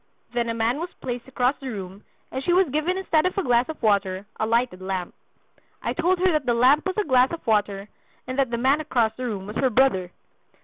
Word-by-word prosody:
Then 240 -1 0
a 230 - -2
man 230 +4 0
was 345 +2 -4
placed 245 -1 -5
across 255 +1 +1
the 270 - -7
room, 195 -2 -7 0.3
and 265 - -4
she 350 - +2
was 370 0 +4
given 310 +6 0
instead 350 -3 +2
of 370 - -5
a 390 - +1
glass 245 0 +2
of 315 - -7
water 200 -2 +1
a 220 - 0
lighted 230 -5 0
lamp. 185 -2 -4 0.7
I - - -1
told 355 +2 +1
her 370 +1 +3
that 305 -5 -1
the 240 - +3
lamp 265 +8 +4
was 375 - -3
a 425 - +2
glass 255 -4 +3
of 335 - -6
water, 205 -2 0 0.4
and 255 +2 -4
that 270 -3 +2
the 235 - -2
man 270 +5 +2
across 240 -7 +1
the 255 - -5
room 205 -5 -4
was 210 +2 -6
her 265 - +2
brother. 210 -7 +2
250 Hz, 235 wpm, -24 LUFS, 220-305 Hz, 0.7 s, was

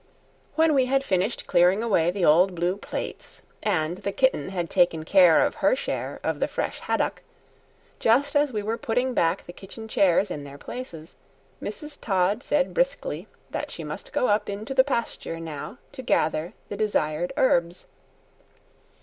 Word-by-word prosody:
When 320 -1 +4
we 260 -3 +3
had 270 +1 +2
finished 195 +1 -1
clearing 180 +5 +3
away 175 -7 +2
the 180 0 0
old 180 +5 +5
blue 175 +2 0
plates, 200 - -7 0.2
and 175 -3 0
the 200 - -3
kitten 230 - +1
had 175 -3 -2
taken 175 -3 +2
care 180 -3 +6
of - - -1
her - - +4
share - - -4
of - - -1
the - - +1
fresh - - -3
haddock, - - -1 0.8
just 275 +6 +3
as 290 -1 +3
we 210 -3 -3
were 225 +2 -2
putting 250 +3 0
back 165 -7 +1
the 175 - -10
kitchen 200 +5 -10
chairs 195 -2 +3
in 145 - -5
their 140 0 -10
places, 165 - -8 0.5
Mrs. 300 -1 -7
Todd 195 +2 +1
said 285 -1 0
briskly - - -1 0.2
that - - -3
she - - -7
must - - -7
go 255 - +1
up 210 0 +1
into 210 +5 -4
the 260 0 +6
pasture 235 -10 -3
now 160 - -7
to 280 -2 -8
gather 160 -7 0
the - - -5
desired 175 -6 0
herbs. 175 -8 +2
200 Hz, 165 wpm, -25 LUFS, 175-255 Hz, 0.8 s, care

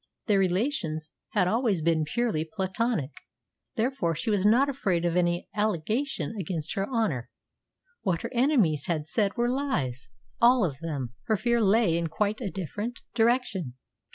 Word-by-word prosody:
Their 205 -4 +3
relations 180 - 0 0.2
had 195 -5 +3
always 215 -5 +1
been 160 -1 +2
purely 215 -1 0
platonic; 190 - -2 0.6
therefore 225 -8 0
she 165 +8 -1
was 200 -3 +1
not 245 +6 +5
afraid 195 -11 0
of 170 0 +1
any 175 -1 +1
allegation 215 - -1
against 165 -3 -3
her 195 +4 -2
honour. 215 - -1 0.7
What 180 -5 -1
her - - -5
enemies 235 - +2
had 155 -4 -1
said 205 +6 0
were 240 0 +2
lies 240 - -2 0.3
all 240 -2 +6
of 140 -5 -4
them. 140 -7 -4
Her 220 - +2
fear 235 +2 +1
lay 200 -5 +3
in 170 - -1
quite 210 +7 -1
a 210 - -2
different 205 +6 -5
direction. 225 - +1
195 Hz, 155 wpm, -27 LUFS, 165-235 Hz, 0.7 s, all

